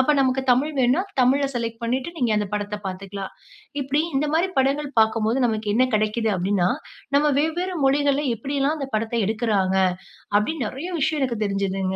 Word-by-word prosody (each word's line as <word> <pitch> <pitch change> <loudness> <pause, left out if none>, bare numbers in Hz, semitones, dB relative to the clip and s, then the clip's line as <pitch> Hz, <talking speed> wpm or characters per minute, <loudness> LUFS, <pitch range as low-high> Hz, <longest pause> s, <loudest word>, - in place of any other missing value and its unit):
அப்ப 260 - +3
நமக்கு 265 0 +2
தமிழ் 270 +5 +2
வேணுனா 255 +7 +3 0.2
தமிழ 265 +3 +4
செலக்ட் 230 -2 -4
பண்ணிட்டு 255 +5 -1
நீங்க 245 -7 0
அந்த 210 - 0
படத்த 210 0 -2
பார்த்துக்கலாம். 195 +1 -6 0.5
இப்டி 280 +2 0 0.2
இந்த 290 +3 +1
மாரி 345 +4 +2
படங்கள் 275 +2 +1
பார்க்கும்போது 220 +2 +2
நமக்கு 215 -2 -1
என்ன 255 - +4
கடைக்கிது 215 +1 +1
அப்டின்னா, 185 0 +1 0.5
நம்ம 295 +1 +3
வெவ்வேறு 350 +4 -1
மொழிகள்ல 285 +1 +2
எப்டிலாம் 280 +4 -1
அந்த 275 -2 -4
படத்த 220 +2 -2
எடுக்குறாங்க. 210 -4 +1 0.6
அப்டின் 275 +6 -2
நெறைய 280 +10 -6
விஷயம் 300 +1 0
எனக்கு 235 -4 -1
தெரிஞ்சுதுங்க. 195 -1 -1
245 Hz, 160 wpm, -23 LUFS, 210-280 Hz, 0.6 s, தமிழ